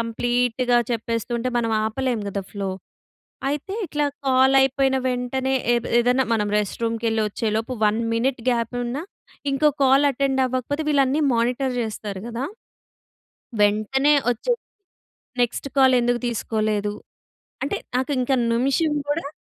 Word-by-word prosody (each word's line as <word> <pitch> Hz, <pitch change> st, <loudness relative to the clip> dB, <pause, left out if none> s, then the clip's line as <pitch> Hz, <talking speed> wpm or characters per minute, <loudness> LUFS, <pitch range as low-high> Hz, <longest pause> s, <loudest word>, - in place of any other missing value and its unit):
కంప్లీట్‌గా 245 Hz, +1 st, +1 dB
చెప్పేస్తుంటే 230 Hz, +2 st, -2 dB
మనం 230 Hz, -1 st, 0 dB
ఆపలేము 235 Hz, 0 st, -1 dB
కదా! 200 Hz, 0 st, -3 dB
ఫ్లో. 200 Hz, -2 st, -3 dB, 0.8 s
అయితే 295 Hz, +7 st, -3 dB
ఇట్లా 295 Hz, -2 st, -1 dB, 0.2 s
కాల్ 260 Hz, +1 st, +4 dB
అయిపోయిన 270 Hz, 0 st, +2 dB
వెంటనే, 255 Hz, +1 st, -1 dB, 0.2 s
ఏద్ 235 Hz, -1 st, 0 dB
ఏదైనా 250 Hz, +2 st, +3 dB
మనం 210 Hz, -2 st, +1 dB
రెస్ట్ 210 Hz, +2 st, -2 dB
రూమ్ 230 Hz, 0 st, 0 dB
కెళ్ళి 225 Hz, -1 st, +1 dB
వచ్చేలోపు 220 Hz, +3 st, -2 dB
1 210 Hz, +2 st, +2 dB, 0.2 s
మినిట్ 250 Hz, +1 st, 0 dB
గ్యాప్ 235 Hz, 0 st, -1 dB
ఉన్నా, 250 Hz, +5 st, -3 dB, 0.5 s
ఇంకో 300 Hz, +3 st, +3 dB, 0.2 s
కాల్ 270 Hz, +2 st, +5 dB
అటెండ్ 270 Hz, 0 st, 0 dB
అవ్వకపోతే 255 Hz, +4 st, -2 dB
వీళ్ళన్నీ 280 Hz, +1 st, +2 dB
మానిటర్ 250 Hz, +3 st, 0 dB
చేస్తారు 210 Hz, -3 st, -5 dB
కదా! 240 Hz, +3 st, -3 dB, 1.2 s
వెంటనే 215 Hz, +8 st, +3 dB, 0.2 s
ఓచ్చే 365 Hz, -, 0 dB, 0.9 s
నెక్స్ట్ 240 Hz, +3 st, -1 dB
కాల్ 265 Hz, -1 st, +6 dB
ఎందుకు 240 Hz, 0 st, +1 dB
తీసుకోలేదు, 215 Hz, -2 st, -1 dB, 0.7 s
అంటే -, -, -1 dB, 0.2 s
నాకు 260 Hz, +3 st, -1 dB
ఇంక 250 Hz, +2 st, 0 dB, 0.2 s
నిమిషం 275 Hz, +6 st, +1 dB, 0.2 s
కూడా. 295 Hz, -1 st, -1 dB
245 Hz, 125 wpm, -23 LUFS, 225-265 Hz, 1.2 s, కాల్